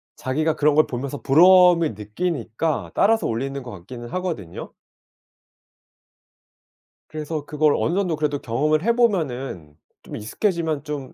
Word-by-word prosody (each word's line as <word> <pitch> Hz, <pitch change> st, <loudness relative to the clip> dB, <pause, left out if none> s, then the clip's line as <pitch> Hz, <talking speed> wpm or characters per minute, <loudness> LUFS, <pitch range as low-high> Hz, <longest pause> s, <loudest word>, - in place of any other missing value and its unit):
자기가 155 Hz, +5 st, -1 dB
그런 150 Hz, 0 st, +2 dB
걸 155 Hz, -, +5 dB
보면서 130 Hz, +3 st, -5 dB
부러움을 175 Hz, 0 st, +5 dB
느끼니까 120 Hz, -, -3 dB
따라서 225 Hz, +2 st, +3 dB
올리는 135 Hz, +4 st, -3 dB
것 120 Hz, -, -9 dB
같기는 120 Hz, +6 st, -10 dB
하거든요. 165 Hz, -, -5 dB, 2.4 s
그래서 155 Hz, -1 st, -5 dB
'그걸 150 Hz, -1 st, +2 dB
어느 170 Hz, -, 0 dB
정도 185 Hz, -5 st, 0 dB
그래도 150 Hz, -1 st, -1 dB
경험을 150 Hz, +8 st, 0 dB
해 235 Hz, +1 st, +2 dB
보면은 135 Hz, -, -1 dB, 0.3 s
좀 -, -, -9 dB
익숙해지면 160 Hz, -, -2 dB
좀 145 Hz, -4 st, -6 dB
150 Hz, 305 characters per minute, -22 LUFS, 125-170 Hz, 2.4 s, 걸